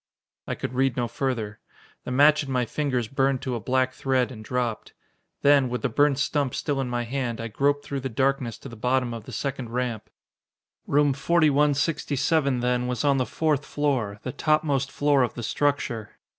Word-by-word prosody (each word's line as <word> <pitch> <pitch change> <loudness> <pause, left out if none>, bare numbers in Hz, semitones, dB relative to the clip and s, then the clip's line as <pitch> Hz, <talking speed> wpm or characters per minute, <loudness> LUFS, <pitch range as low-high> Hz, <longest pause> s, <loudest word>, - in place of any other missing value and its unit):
I - - -2
could - - -5
read 130 0 +1
no 120 -1 0
further. 115 -4 -3 0.5
The - - -4
match 145 +4 +5
in 135 - -6
my 125 -1 +1
fingers 130 -3 -1
burned 135 +1 0
to 130 - -2
a 120 - -2
black 130 +3 +1
thread 130 -1 0
and 110 -3 -9
dropped. 120 -1 -3 0.5
Then, 140 -2 +5
with 125 +2 -3
the 140 - +1
burnt 145 +3 +3
stump 140 -1 0
still 140 -3 -1
in 130 - -3
my 120 0 -1
hand, 120 -1 -3
I 115 0 -4
groped 145 +5 +1
through 140 - -3
the 135 0 -4
darkness 130 -1 0
to - - -6
the 115 - -10
bottom 125 +1 0
of 115 -3 -7
the - - -9
second 135 -4 -3
ramp. 120 -3 -3 0.8
Room 145 0 +3
4167, 145 -2 +2
then, 125 0 0
was 125 +2 -2
on 140 -1 +4
the 130 - 0
fourth 150 -3 0
floor 130 -10 -1
the 130 - -3
topmost 145 -2 +1
floor 145 -1 +2
of 125 - 0
the 120 - -5
structure. 120 -3 -1
130 Hz, 190 wpm, -25 LUFS, 120-145 Hz, 0.8 s, match